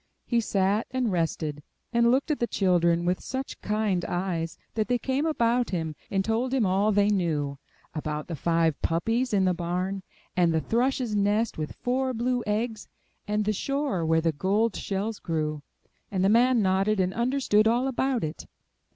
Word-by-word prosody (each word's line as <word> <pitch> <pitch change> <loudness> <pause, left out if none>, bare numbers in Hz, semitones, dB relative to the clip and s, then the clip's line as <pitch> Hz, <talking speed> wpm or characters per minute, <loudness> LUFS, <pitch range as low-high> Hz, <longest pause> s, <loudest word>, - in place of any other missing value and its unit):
He 235 -1 +1
sat 200 +1 +1
and 255 -4 0
rested, 160 -4 -1 0.3
and 235 0 +4
looked 270 +5 +2
at 300 - -1
the 235 - +1
children 175 -4 +2
with 180 +1 0
such 265 +1 -5
kind 210 -4 0
eyes 175 -3 -2 0.2
that 215 -1 -1
they 245 - +2
came 265 +5 -1
about 240 -5 +1
him, 160 -4 -3
and 195 -1 0
told 240 +4 0
him 245 -5 +2
all 195 +3 +2
they 205 0 +3
knew; 155 -8 0 0.3
about 150 -1 -3
the 170 - -4
five 165 0 +1
puppies 225 +10 0
in 195 -3 +3
the 185 - +3
barn, 180 +3 -2 0.3
and 175 -2 +3
the - - +3
thrush's 245 +3 0
nest 205 0 +1
with 155 - -4
four 255 +1 -1
blue 245 +1 0
eggs, 215 +1 -2 0.4
and 210 0 0
the 215 - +1
shore 275 - -1
where 160 0 +2
the 165 0 +2
gold 200 +8 +1
shells 205 +2 -3
grew; 155 -2 -2 0.5
and 190 -1 0
the - - +4
man 240 +1 +4
nodded 195 +2 +2
and 185 0 +1
understood 235 -3 +2
all 240 +3 +2
about 265 -2 0
it. 155 0 -5
205 Hz, 175 wpm, -27 LUFS, 175-235 Hz, 0.5 s, and